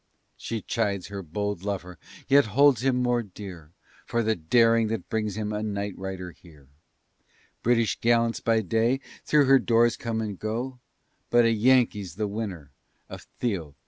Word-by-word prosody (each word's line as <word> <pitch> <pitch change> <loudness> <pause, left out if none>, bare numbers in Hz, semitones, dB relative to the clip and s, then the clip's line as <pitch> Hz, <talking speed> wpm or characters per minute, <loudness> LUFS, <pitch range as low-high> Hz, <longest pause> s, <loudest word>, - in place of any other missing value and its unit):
She 115 -2 -5
chides 100 -5 -2
her 100 -1 -5
bold 100 +3 -4
lover, 90 -4 -5 0.3
yet 140 +1 +5
holds 140 -5 +5
him 135 -1 +2
more 120 -1 +1
dear, 90 -6 -10 0.4
For 115 0 0
the 110 0 +1
daring 115 +6 +3
that 115 +1 -4
brings 110 -3 -2
him 105 -1 -3
a 105 - -2
night 100 -2 -3
rider 95 -1 -6
here; 75 -7 -19 0.9
British 115 -1 +1
gallants 115 0 +2
by 115 -1 +2
day 115 +6 +1 0.3
through 150 -2 +4
her 135 0 +6
doors 120 -1 +3
come 115 -1 -3
and 105 -4 -4
go, 120 +4 -4 0.5
But 120 0 +5
a 115 - +4
Yankee's 110 -6 +2
the 105 +1 -2
winner 100 -9 -5 0.4
of - - -10
Theo. 90 - -3
110 Hz, 160 wpm, -26 LUFS, 95-115 Hz, 0.9 s, her